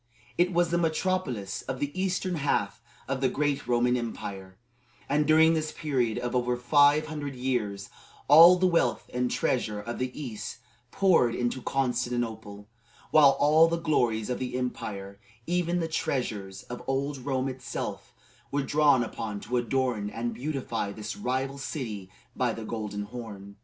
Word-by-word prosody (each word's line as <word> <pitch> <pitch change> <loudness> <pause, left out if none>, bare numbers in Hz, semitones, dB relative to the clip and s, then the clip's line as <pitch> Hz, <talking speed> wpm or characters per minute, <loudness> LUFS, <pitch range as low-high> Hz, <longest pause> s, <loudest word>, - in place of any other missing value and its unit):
It 180 +1 +2
was 175 -1 +2
the 170 - +2
metropolis 160 - -1
of 130 0 -5
the 145 0 -2
eastern 185 -1 -1
half 145 -1 -1 0.3
of 135 -1 -2
the 130 - +3
great 145 0 -1
Roman 125 0 +2
Empire, 100 -5 -5 0.5
and 150 +1 +1
during 160 +1 +6
this 155 -1 -1
period 125 -7 -1
of 120 0 -3
over 125 0 +1
five 145 +4 +4
hundred 150 -3 -5
years 115 -6 -2 0.4
all 165 +5 +9
the 185 +1 +1
wealth 130 -11 +1
and 125 0 0
treasure 110 -5 -1
of 115 +3 -6
the 130 0 -1
east 110 -7 -6 0.3
poured 165 -10 +3
into 120 +1 -1
Constantinople, 120 -6 -2 0.4
while 140 -3 +6
all 155 +3 +6
the 170 0 0
glories 125 -9 0
of 125 - -2
the 125 -1 -3
empire, 100 -6 -5 0.3
even 175 0 0
the 165 - -1
treasures 105 - -3
of 125 - -8
old 135 +1 -1
Rome 130 0 -1
itself, 130 - -5 0.4
were 140 +2 -1
drawn 145 -3 +4
upon 105 -2 -5
to 125 - -2
adorn 120 -3 0
and 115 +2 -3
beautify 125 -5 -3
this 105 +1 -6
rival 135 +2 -2
city 110 -9 -5 0.3
by - - 0
the 115 - -7
Golden 105 -2 -4
Horn. 105 -3 -9
125 Hz, 155 wpm, -28 LUFS, 115-150 Hz, 0.5 s, all